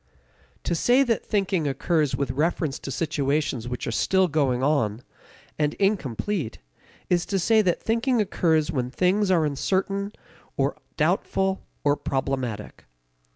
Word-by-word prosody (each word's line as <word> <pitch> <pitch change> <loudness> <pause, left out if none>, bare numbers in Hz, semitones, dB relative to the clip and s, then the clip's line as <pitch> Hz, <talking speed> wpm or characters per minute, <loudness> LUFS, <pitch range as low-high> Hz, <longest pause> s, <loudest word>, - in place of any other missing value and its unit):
To - - -1
say 245 +10 +4
that 235 -4 0
thinking 190 -6 0
occurs 150 +2 +1
with 140 -2 -1
reference 150 +1 -1
to - - -7
situations 145 -4 -1
which 125 0 -4
are - - -2
still 190 +10 +2
going 135 -5 +1
on, 130 -6 +1 0.6
and 150 -1 +1
incomplete, 195 - -1 0.5
is 175 -1 +2
to 195 - 0
say 220 +4 +4
that 180 -4 +1
thinking 235 +2 +1
occurs 165 -6 +1
when 125 -5 -1
things 185 +7 +2
are 170 -4 +3
uncertain 195 +7 -1 0.5
or - - +1 0.2
doubtful 190 0 +1 0.2
or 145 0 +3
problematic. 130 -7 -3
155 Hz, 135 wpm, -25 LUFS, 135-195 Hz, 0.6 s, say